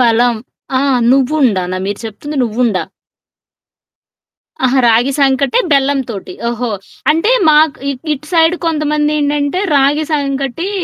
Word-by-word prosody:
బలం. 240 0 +3 0.4
ఆ! - - 0 0.3
నువ్వుండానా? 250 -9 +1
మీరు 200 0 -3
చెప్తుంది 255 +8 -7
నువ్వుండా! 230 -3 0 1.8
ఆహా! 260 +1 +2
రాగి 235 +4 +3
సంకటే 275 - +2
బెల్లం 280 0 +2
తోటి. 195 -4 -7
ఓహో! 240 0 -3 0.4
అంటే, 330 +9 +1 0.2
మాకు 305 -1 +4
ఇ - - -1 0.2
ఇటు 300 +1 -6
సైడ్ 330 0 +4
కొంతమందేంటంటే, 300 0 0 0.2
రాగి 285 +3 +2
సంకటీ 275 +3 -2
275 Hz, 110 wpm, -14 LUFS, 240-300 Hz, 1.8 s, మాకు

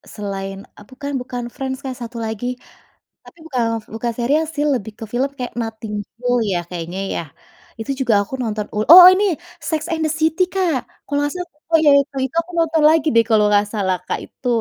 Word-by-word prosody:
selain, 195 -2 -5 0.2
eee, 210 - -14
bukan 280 +2 -6
bukan 250 -1 -5
Friends 265 -1 -4
Kak, 260 -1 -4
satu 235 0 -7
lagi, 220 +2 -4 0.8
tapi 340 - -17
bukan 255 -5 0 0.3
bukan 235 +1 -2
serial 295 +7 +2
sih 290 - 0
lebih 220 -3 -3
ke - - -6
film 260 +3 +1
kayak 250 -1 -5
Nothing 220 -1 -6
You - - -41
Know 245 0 +1 0.2
ya 175 - +1
kayaknya 175 +1 -5 0.2
ya, - - -1 0.6
itu 225 +4 -3
juga 240 -4 +2
aku 205 - -14
nonton 215 -2 -2
oh 210 - +1
oh 360 0 +12
ini! 395 +3 +1 0.5
Sex 315 -2 0
And 320 - -2
The 305 - 0
City 320 +4 +3
Kak. 365 -7 +1 0.3
Kalau 285 0 -1
nggak 290 0 -1
salah 355 -1 -5 0.2
oh - - +8
iya 295 - +6
itu 280 0 -11
Itu 265 +5 -8
aku 360 - -14
nonton 320 -1 +2
lagi 320 -1 +3
deh 230 - +6
kalau 215 -2 +4
nggak 205 0 +4
salah 190 -3 0
Kak - - -2
itu. 250 - -9
250 Hz, 210 wpm, -20 LUFS, 215-300 Hz, 0.8 s, oh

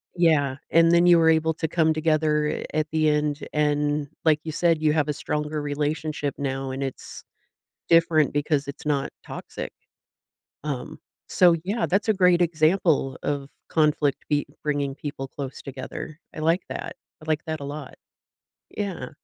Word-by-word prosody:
Yeah, 150 -6 +3
and 165 0 +5
then 170 +1 +5
you 175 -1 +7
were 160 0 +5
able 160 0 +3
to 160 - -2
come 160 0 +2
together 155 -1 +1
at 155 0 0
the 155 -1 +3
end, 150 -1 0
and, 150 -1 +1 0.2
like 155 -2 +4
you 160 - -4
said, 165 0 +2
you 155 -1 +3
have 155 -2 +1
a 150 - 0
stronger 150 +1 -3
relationship 150 0 -2
now, 135 -1 -3
and 135 +1 -3
it's 135 -1 -7 0.7
different 165 -3 +4
because 145 -1 0
it's 140 - -8
not 140 -2 0 0.2
toxic. - - -7 0.9
Um, 140 -4 -5 0.3
so, 175 -2 +5
yeah, 210 +5 0
that's 195 +4 0
a 220 - +4
great 180 -2 +4
example 160 -4 +2
of 140 -1 -2 0.2
conflict 150 -2 +1
be 145 -1 +1 0.2
bringing 145 -2 -1
people 140 -1 -6
close 135 0 -7
together. 140 +3 -7
I - - -9
like 165 +4 +2
that, - - -5 0.3
I 155 - -13
like 155 -1 0
that 160 0 -3
a - - -6
lot. 140 -1 -7 0.8
Yeah. 190 -11 -4
150 Hz, 160 wpm, -25 LUFS, 145-160 Hz, 0.9 s, you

